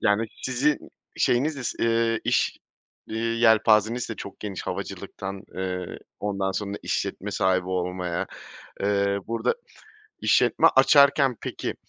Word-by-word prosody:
yani, 105 +2 +2 0.2
sizin 135 +4 +1 0.4
şeyiniz 140 +5 +2
is 125 - -3
eee, 115 0 +2
iş, - - +1 0.5
eee, 110 - -4
yelpazeniz 115 0 +3
de 115 - -4
çok 100 - -9
geniş 100 -3 -5
havacılıktan, 95 +1 -5
eee, 90 -1 -4 0.2
ondan 100 -2 -1
sonra 100 0 -3
işletme - - -2
sahibi 95 -1 +1
olmaya. 90 -1 -2 0.6
Eee, 100 0 +1
burada 115 - 0 0.7
işletme - - +4
açarken 140 -3 +5
peki, - - -4
105 Hz, 115 wpm, -25 LUFS, 95-115 Hz, 0.7 s, açarken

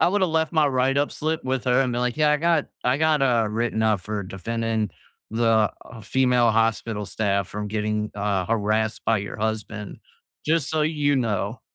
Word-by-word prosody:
I - - +5
woulda 190 0 +2
left 160 -1 0
my 155 -2 +4
write-up 135 +2 +1
slip 160 +1 -2
with 130 -1 -1
her, 125 +1 +3
and 130 -2 +1
been 120 - -1
like, 125 -1 -1
"Yeah, 150 -1 +3
I 150 - +4
got 165 -1 +1 0.2
I 125 +2 +3
got," 155 -2 +2
uh, 120 -4 +3
"written 110 0 -1
up 110 -3 +2
for 105 +2 -4
defending 110 +3 -2 0.4
the 110 -2 +2 0.3
female 125 -2 +3
hospital 115 -2 0
staff 100 -3 -1
from 105 0 -5
getting," 105 0 -2
uh, 100 -3 -1
"harassed 110 0 0
by 115 -2 +2
your 100 - -6
husband. 110 -1 -4 0.5
Just 160 -3 +1
so 155 -1 +1
you 150 -2 +1
know." 110 -2 -1
115 Hz, 185 wpm, -24 LUFS, 105-140 Hz, 0.5 s, I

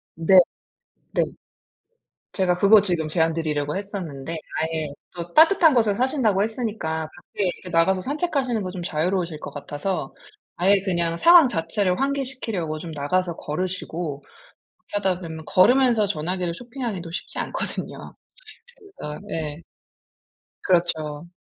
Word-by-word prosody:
네. 165 +3 +4 0.8
네. - - +2 1.1
제가 180 -2 +1
그거 200 +2 +6
지금 170 -5 0
제안 160 +1 +2
드리려고 150 -1 -2
했었는데 170 -8 -5 0.3
아예 160 -1 -1 0.3
또 175 0 -7
따뜻한 325 0 +6
곳에 220 -5 +3
사신다고 240 -5 +2
했으니까 210 -9 -2
밖에 205 - -3
이렇게 180 0 -4
나가서 180 +3 +3
산책하시는 275 - -1
거 185 - -4
좀 180 -2 -6
자유로우실 170 0 -1
것 - - -7
같아서 145 +2 -4 0.4
아예 195 +3 +4
그냥 170 -3 0
상황 335 - +7
자체를 180 0 0
환기시키려고 255 - -2
좀 165 +1 -7
나가서 170 +4 -1
걸으시고 165 -3 -4 0.6
그렇게 - - -25 0.2
하다 180 0 -2
보면 160 -2 -7
걸으면서 235 +2 +4
전화기를 180 -1 -2
쇼핑하기도 230 -7 -5
쉽지 - - -6
않거든요. - - -4 0.8
그러니까 150 +3 -6
예. 155 -1 -4 1.0
그렇죠. 165 -3 0
180 Hz, 320 characters per minute, -23 LUFS, 160-210 Hz, 1.1 s, 상황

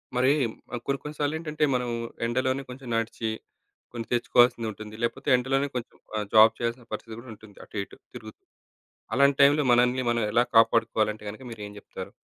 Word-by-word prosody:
మరి 130 +2 +4 0.4
ఆహ్, 120 - -5
కొన్ని 140 0 -1
కొన్ని 150 +1 -7
సార్లేంటంటే, 155 +1 -1
మనం 125 -1 -1 0.4
ఎండలోనే 130 +3 0
కొంచెం 125 0 -9
నడిచి, 115 0 -2 0.6
కొంచెం 115 -2 -5
తెచ్చుకోవాల్సింది 120 -1 +3
ఉంటుంది. 105 +1 -10
లేకపోతే 135 +3 -2
ఎండలోనే 135 +3 0
కొంచెం 120 -2 -5 0.2
ఆహ్, 105 - -2
జాబ్ 110 +1 +7
చేయాల్సిన 120 0 -3
పరిస్థితి 110 +1 -6
కూడా 125 +1 -12
ఉంటుంది. 105 -1 -17
అటు 105 - -6
ఇటు - - -15 0.2
తిరుగుతూ. - - -11 0.7
అలాంటి 140 +1 +4
టైమ్‌లో 145 +1 +5
మనల్ని 125 +1 +3
మనం 115 -2 0
ఎలా 120 +2 +3
కాపాడుకోవాలంటే 115 -1 +3
గనుక 110 +5 -12
మీరు 110 -2 -8
ఏం - - -11
చెప్తారు? 95 -1 -9
120 Hz, 165 wpm, -26 LUFS, 110-135 Hz, 0.7 s, జాబ్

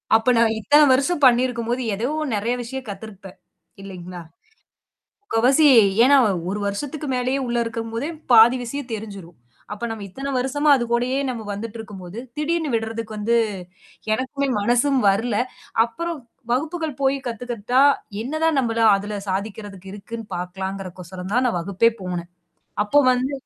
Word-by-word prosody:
அப்ப, 225 +3 +3
நான் 225 -1 +3
இத்தன 290 +8 +5
வருஷம் 285 +4 +1
பண்ணியிருக்கும்போது, 245 -1 +2
ஏதோ 225 +5 -2 0.3
நெறைய 220 +4 -1
விஷயம் 265 +2 -6
கத்திருப்பேன், 195 -2 -10 0.4
இல்லைங்களா? 180 -2 -8 1.0
முக்காவாசி, 265 - +3 0.4
ஏன்னா 280 +3 +6 0.3
ஒரு 205 +2 -2
வருஷத்துக்கு 290 +9 -4
மேலேயே 255 +2 0
உள்ள 240 0 -1
இருக்கும்போதே, 230 +4 -4 0.2
பாதி 230 +2 +8
விஷயம் 265 +2 -6
தெரிஞ்சிரும். 200 -6 -8 0.4
அப்ப, 210 - -9
நம்ம 220 -2 -6
இத்தன 270 +8 -5
வருஷமா 290 +4 0
அது 240 - -2
கூடயே 250 +3 +1
நம்ம 235 -3 -4
வந்துட்டு 220 +2 -6
இருக்கும்போது, 195 -2 -8 0.2
திடீர்னு 320 +1 -1
விடுறதுக்கு 225 -1 -4
வந்து 220 +3 +1 0.8
எனக்குமே 275 +4 -2
மனசும் 245 +5 +2
வரல. 215 +3 0 0.5
அப்புறம், 335 +7 -5 0.3
வகுப்புகள் 310 +1 -3
போய் 270 +1 +2
கத்துகிட்ட 235 -1 -6 0.5
என்னதான் 315 +3 0
நம்மள 230 -2 -1 0.2
அதல 205 +1 -4
சாதிக்கறதுக்கு 195 -1 -5
இருக்குன்னு 225 +2 -8
பாக்கலாங்கறகு 190 +1 -5
கோசரம் 180 +2 -8
தான் 255 +1 +3
நான் 230 - 0
வகுப்பே 200 +6 +2
போனேன். 175 -1 -5 0.5
அப்போ 210 +8 +1
வந்து 255 +2 0
230 Hz, 135 wpm, -22 LUFS, 200-260 Hz, 1.0 s, பாதி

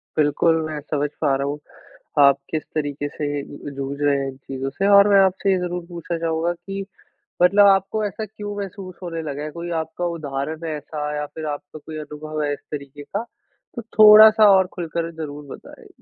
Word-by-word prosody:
बिल्कुल, 155 +2 +3
मैं 155 -1 -4
समझ 145 0 -2
पा 140 -3 +3
रहा 140 +1 -2
हूँ। 145 +1 -3 0.6
आप 140 -1 +7
किस 155 -1 -2
तरीके 145 -1 -2
से 145 -1 -3
ज 145 0 -9
जूझ 140 +1 -4
रहे 145 -1 +3
हैं 135 - -2
इन 130 - -11
चीज़ों 135 0 -5
से 195 +8 -1
और 200 0 +7
मैं 200 -1 +6
आपसे 190 +1 0
ये 190 - +3
ज़रूर 175 -1 -4
पूछना 170 0 -4
चाहूँगा 165 +1 -1
कि 195 +2 -7 0.6
मतलब 200 +3 +6
आपको 195 +2 +3
ऐसा 215 +2 -5
क्यों 205 0 -7
महसूस 195 -2 -7
होने 165 -2 -4
लगा 145 -1 -5
है, 155 - -5
कोई 170 +2 -7
आपका 160 +2 -5
उदाहरण 150 +3 -4
है 155 -1 -3
ऐसा 150 0 -5
या 150 0 -2
फिर 155 +1 -8
आपका 145 +1 -11
कोई 155 +1 -9
अनुभव 150 +1 -6
है 145 - 0
इस - - -4
तरीके 145 -1 -7
का 205 +9 -4 0.5
तो 235 - -4 0.2
थोड़ा-सा 215 0 +9
और 190 - +2
खुलकर 170 -1 -3
ज़रूर 150 -2 -7
बताएँ? - - -15
155 Hz, 200 wpm, -22 LUFS, 145-185 Hz, 0.6 s, थोड़ा-सा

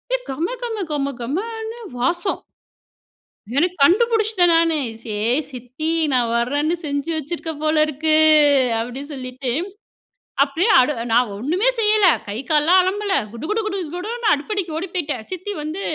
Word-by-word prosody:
ஏ - - +1
கம 340 - -3
கம 445 -5 -3
கம 280 -1 -1
கமன்னு 445 - -4 0.2
வாசம். 345 +10 0 1.1
எனக்கு 355 +5 +2
கண்டுபுடிச்சுட்டேன் 430 0 +3
நானே, 330 -2 +3 0.2
"சே! 215 -2 -4 0.4
சித்தி 255 +5 -5 0.2
நா 255 - +4 0.2
வரேன்னு 285 +8 0
செஞ்சு 285 +3 -2
வச்சுருக்க 325 +2 -4
போல 310 0 +2
இருக்கு." 310 +1 0 0.6
அப்படீன்னு 265 +6 -6
சொல்லிட்டு 255 0 -5 0.9
அப்படியே 320 +9 +1
அடு 255 +4 +2 0.2
நான் 240 -2 +3
ஒண்ணுமே 345 - 0
செய்யல. 425 -2 +4 0.2
கை, 205 +1 -5
கால்லலாம் 320 +5 +5
அலம்பல. 395 +2 -1 0.2
குடு 235 +3 -9
குடு 440 +1 +1
குடு 395 -2 -2 0.2
குடுன்னு 440 +5 -3
அடுப்படிக்கு 345 +2 -2
ஓடி 355 +4 -3
போய்ட்டேன். 300 -10 -3
சித்தி 370 +3 -5
வந்து 315 +6 -5
325 Hz, 135 wpm, -20 LUFS, 280-395 Hz, 1.1 s, கால்லலாம்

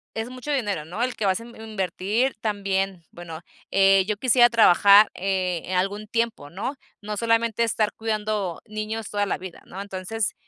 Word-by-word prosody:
Es 225 +2 -3
mucho 255 +3 -6
dinero, 205 - -1
¿no?, 180 +9 -3
el 255 0 -1
que 215 - -2
vas 190 +2 +2
a - - -9
in 235 0 -13
invertir 215 +4 -1
también, 195 -4 -1
bueno, 170 -2 -9 0.3
eh, 195 0 +5
yo 210 -1 -1
quisiera 240 +1 +5
trabajar, 205 -2 +6
eh, 185 -2 -2
algún 200 +3 -1
tiempo, 230 -10 -2
¿no?, 205 - -4 0.3
no 210 0 -5
solamente 230 0 +1
estar 215 -2 0
cuidando 215 -5 -2
niños 215 0 -5
toda 205 0 0
la - - -1
vida, 185 -2 -10
¿no?, 190 - -9
entonces, 200 +2 -3
210 Hz, 170 wpm, -24 LUFS, 190-225 Hz, 0.3 s, trabajar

